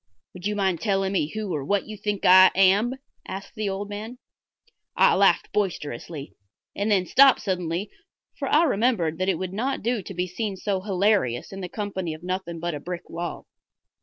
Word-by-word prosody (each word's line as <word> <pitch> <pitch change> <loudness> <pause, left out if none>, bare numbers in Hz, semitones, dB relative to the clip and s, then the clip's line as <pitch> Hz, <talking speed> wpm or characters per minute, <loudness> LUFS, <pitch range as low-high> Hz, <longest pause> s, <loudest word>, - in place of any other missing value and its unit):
"Would 180 +2 -5
you 210 - -1
mind 190 -4 0
telling 195 -2 0
me 165 -6 +1
who 210 -4 -3
or 145 -3 -2
what 200 +7 0
you 215 - -8
think 210 -1 -3
I 185 +1 +9
am?" 195 +6 +4 0.3
asked 195 +1 -7
the 215 -3 -2
old 195 +1 -4
man. 215 +4 -7 0.8
I - - +6
laughed - - +3
boisterously 155 - -3 0.4
and 205 +2 -1
then 195 -3 +3
stopped 270 +6 +6
suddenly, 180 0 -2 0.5
for 275 - -2
I 305 +5 +4
remembered 205 - +1
that 185 +1 +1
it 185 - +1
would 185 +1 -5
not 250 +5 -2
do 235 -1 0
to 195 - -9
be 180 +1 0
seen 195 +2 -4
so 190 0 -2
hilarious 190 - +1
in 195 - -6
the 180 - -5
company 190 -6 -4
of 155 - -15
nothing 180 -2 -4
but 170 0 -3
a 145 - -4
brick 175 +3 -7
wall. 170 +1 -5
195 Hz, 195 wpm, -25 LUFS, 180-210 Hz, 0.8 s, I